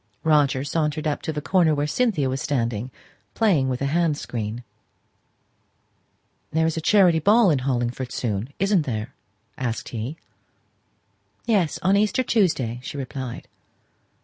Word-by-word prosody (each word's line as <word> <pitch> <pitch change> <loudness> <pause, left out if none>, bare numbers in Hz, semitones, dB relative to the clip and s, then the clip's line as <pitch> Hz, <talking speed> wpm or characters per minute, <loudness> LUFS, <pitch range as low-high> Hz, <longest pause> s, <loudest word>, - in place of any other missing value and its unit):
Roger 145 -4 +3
sauntered 150 +1 -1
up 150 -1 -1
to - - -3
the 150 -1 -5
corner 170 -4 +3
where 145 0 0
Cynthia 175 - +1
was 130 0 -2
standing, 120 -4 -1 0.5
playing 175 -13 +2
with 125 +1 -2
a 140 +1 -1
hand 165 -3 +2
screen. 115 -1 -5 1.9
"There 160 +1 +2
is 160 - 0
a 160 - -2
charity 180 -2 +4
ball 205 +3 +5
in 145 - +2
Hollingford 125 -1 -2
soon, 110 +1 -3
isn't 195 -5 +1
there?" 115 +1 -3 0.5
asked 120 -3 -3
he. 120 +7 -5 1.3
"Yes; 200 -9 +1
on 190 +2 +4
Easter 210 +4 +2
Tuesday," 155 - +1
she 140 +2 -7
replied. 130 -2 -6
145 Hz, 140 wpm, -23 LUFS, 125-170 Hz, 1.9 s, ball